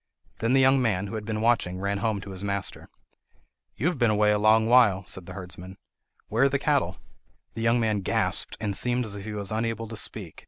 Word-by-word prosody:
Then 115 +3 +1
the 135 - +5
young 135 0 +5
man, 100 -6 0
who 100 - -7
had 110 -1 -4
been 110 -1 -3
watching, 110 -6 +1
ran 100 +1 -1
home 105 -1 -1
to 100 - -9
his 95 +1 -6
master. 100 -1 -2 0.9
"You 125 - -3
have 175 -5 0
been 120 -2 +4
away 105 0 +3
a 105 - +2
long 110 +1 +4
while," 110 -6 +5
said 90 -1 -8
the 95 - -8
herdsman. 95 0 -8 0.5
"Where 115 +5 +2
are - - +4
the 140 - +1
cattle?" 140 - 0 0.6
The 115 - -5
young 115 +1 +3
man 110 -3 +1
gasped, 95 - -1
and 100 -2 -2
seemed 125 +3 0
as 105 -2 -5
if 100 -1 -8
he 110 - -5
was 100 -1 -5
unable 115 0 -2
to 115 - -6
speak. 100 -5 -5
110 Hz, 230 wpm, -26 LUFS, 100-115 Hz, 0.9 s, the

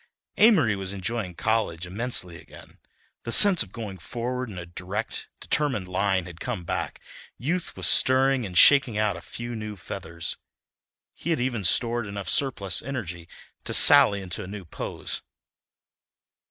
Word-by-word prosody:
Amory 175 - +5
was 95 0 -4
enjoying 100 -1 -4
college 110 -7 -1
immensely 90 -3 -4
again. - - -16 0.4
The 115 - -6
sense 195 - +7
of 100 - -3
going 105 -5 -7
forward 125 +6 -4
in 95 - -9
a 85 - -6
direct, 95 +5 -5
determined 130 -11 -1
line 95 0 0
had 85 -1 -11
come 90 - -4
back; - - -4 0.4
youth 170 +8 -3
was - - +1
stirring 130 0 +4
and 90 -4 -4
shaking 135 -4 +6
out 105 -3 +1
a 85 - -9
few 120 0 -7
new 105 -1 -6
feathers. 85 -4 -5 0.8
He 170 - -7
had 165 - +1
even 120 -4 -2
stored 115 +4 +1
enough 100 -1 -4
surplus 110 -9 +1
energy 90 -11 -6 0.3
to - - 0
sally 100 -1 +7
into 90 -1 -5
a - - -9
new 100 -1 -8
pose. 80 - -5
105 Hz, 155 wpm, -25 LUFS, 90-125 Hz, 0.8 s, sense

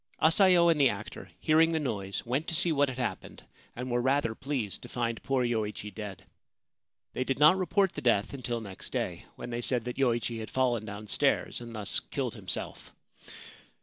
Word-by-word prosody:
Asayo 175 +1 +5
and 155 -3 +2
the 135 - +6
actor, 105 -3 -7
hearing 160 +1 +4
the 160 - +1
noise, 100 -9 -3
went 130 +7 -1
to 165 - -1
see 175 +1 +3
what 145 -2 +2
had 130 - -6
happened, 125 - -4 0.3
and 125 +1 -5
were 120 0 +1
rather 130 -2 +1
pleased 125 -5 -3
to - - -11
find 115 -2 -2
poor 135 -2 0
Yoichi 105 -3 -2
dead. 105 -5 -7 0.9
They 130 - -1
did 135 0 -1
not 150 +4 +7
report 190 +1 +1
the - - -5
death 115 -3 +2
until 120 -3 -3
next 100 -3 -7
day, - - -3
when 120 - -7
they 120 0 -2
said 120 -1 +1
that 125 +2 -5
Yoichi 120 -3 +1
had 110 - -6
fallen 120 -4 +1
down 105 0 -7
stairs 105 - +1
and 115 -1 -8
thus 105 -2 0
killed - - -4
himself. - - -4
125 Hz, 190 wpm, -29 LUFS, 110-145 Hz, 0.9 s, not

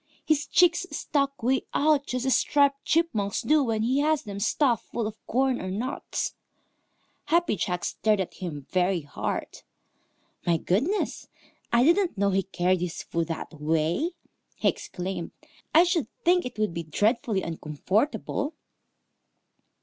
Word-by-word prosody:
His 305 -1 +1
cheeks 355 +1 +4
stuck 275 -3 -1
way 260 +3 +1
out 295 -1 +3
just 250 0 -2
as 265 -3 +4
Striped 280 0 +2
Chipmunk's 225 -12 +1
do 300 -1 +4
when 225 -3 0
he 255 +4 +2
has 305 0 +2
them 200 -3 -6
stuffed 240 +2 +1
full 235 - -2
of 215 0 -7
corn 260 +1 +1
or 185 - -4
nuts. 235 +8 -3 0.9
Happy 340 -6 +2
Jack 180 -1 -2
stared 215 0 +1
at 190 - -2
him 155 -7 -6
very 180 -1 +2
hard. 145 - -4 0.8
"My 170 -1 +2
goodness, 270 - 0 0.4
I 235 +1 +5
didn't 340 - +3
know 200 0 +2
he 195 +1 +2
carried 185 -1 0
his 175 -2 -3
food 165 -1 -2
that 165 0 -5
way!" 160 - 0 0.4
he - - 0
exclaimed. 180 -2 -5 0.4
"I 330 - +7
should 345 - +1 0.2
think 355 -3 +4
it 245 - -11
would 215 -5 0
be 170 - -3
dreadfully 205 - 0
uncomfortable." 210 - -1
225 Hz, 145 wpm, -27 LUFS, 185-290 Hz, 0.9 s, I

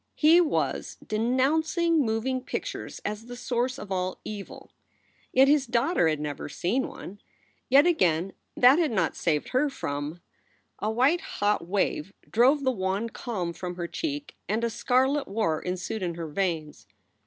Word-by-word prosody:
He 325 +3 +6
was 325 -3 -1
denouncing 300 +8 +2
moving 240 +3 -1
pictures - - -5
as 210 +2 -4
the 245 - -7
source 245 +1 -1
of 205 - -9
all 185 0 -2
evil. 205 -2 -8 0.6
Yet 265 +1 +6
his 285 -1 +3
daughter 240 - +2
had 155 -2 0
never 150 -1 -5
seen 230 - -1
one. 200 +3 -10 0.5
Yet 275 +4 +7
again 185 - +2 0.2
that 255 +6 +7
had 325 -3 +2
not 185 -8 0
saved 150 -4 0
her 280 +3 +2
from 145 - -4 0.6
A 215 - -1
white 260 +10 +3
hot 205 -4 -1
wave 195 -2 -1
drove 265 +6 +4
the 260 - +3
wan 195 +1 -1
calm 195 -8 -4
from 180 +1 -6
her 175 -1 -4
cheek, 290 - -4
and 220 +3 0
a 235 - 0
scarlet 265 +5 +1
war 195 -6 0
ensued 185 +4 -3
in 175 -2 -2
her 165 -1 -5
veins. 155 - -3
220 Hz, 155 wpm, -27 LUFS, 180-265 Hz, 0.6 s, Yet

